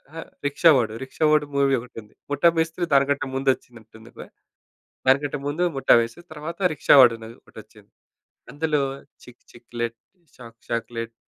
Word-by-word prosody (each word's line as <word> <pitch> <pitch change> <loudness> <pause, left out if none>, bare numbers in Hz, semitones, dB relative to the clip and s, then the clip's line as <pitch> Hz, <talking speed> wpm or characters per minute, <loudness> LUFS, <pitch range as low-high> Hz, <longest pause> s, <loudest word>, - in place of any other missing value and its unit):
అహ్! 165 - -8 0.2
రిక్షా 160 +3 +4
వాడు 110 -3 -1
రిక్షా 135 +4 -2
వాడు 150 -1 +3
మూవీ 140 -1 +3
ఒకటి 120 -1 -16
ఉంది. 105 - -24 0.2
ముఠా 145 +4 +4
మేస్త్రి 165 +2 -1
దానికంటే 140 0 +2
ముందు 135 0 0
వచ్చిందంటుంది 110 -1 -18
గా! - - -9 0.8
దానికంటే 140 +2 +2
ముందు 155 +5 -1
ముఠా 135 - +4
మేస్త్రి 115 +10 -6
తర్వాత 155 +4 -8
రిక్షా 145 - +4
వాడు 120 -3 +6
అని 110 0 -11
ఒకటొచ్చింది 110 -1 -16 0.6
అందులో 150 0 -1 0.4
చిక్ 125 -1 -17
చిక్లెట్ 120 -1 -6 0.4
షాక్ 115 -2 -14
చాక్లెట్ 115 0 -4
135 Hz, 150 wpm, -23 LUFS, 115-150 Hz, 0.8 s, వాడు